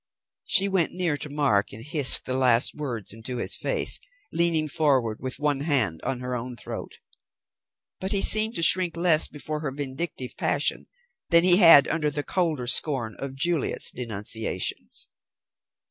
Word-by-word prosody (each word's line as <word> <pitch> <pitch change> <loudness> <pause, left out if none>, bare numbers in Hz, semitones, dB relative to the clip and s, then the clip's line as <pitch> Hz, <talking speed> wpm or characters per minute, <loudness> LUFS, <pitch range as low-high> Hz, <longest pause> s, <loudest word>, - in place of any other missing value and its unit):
She 195 +1 +3
went 190 -4 -1
near 180 -4 -2
to 150 - -5
Mark, 140 -9 0
and 110 +3 -10
hissed 150 -3 +4
the 130 - -3
last 125 -2 +3
words 120 -10 -4
into 115 +3 -5
his - - -1
face, - - +1 0.3
leaning 165 -2 +3
forward, 135 -8 0
with 130 -1 -3
one 145 -2 -1
hand 130 - -1
on 125 -2 -5
her 125 0 -5
own 125 +1 -6
throat. - - -9 1.0
But 190 - -2
he 200 - +4
seemed 220 +2 +4
to 170 - -2
shrink 175 0 +3
less 165 -2 +2
before 150 +1 -6
her 150 -2 -4
vindictive 135 0 -5
passion - - -1 0.4
than 170 0 +5
he 180 -1 +7
had 165 -7 +7
under 155 -2 -1
the 145 0 -4
colder 160 -9 -2
scorn 120 -3 0
of 135 -1 -6
Juliet's 160 +2 0
denunciations. 110 -4 -5
145 Hz, 160 wpm, -24 LUFS, 125-165 Hz, 1.0 s, he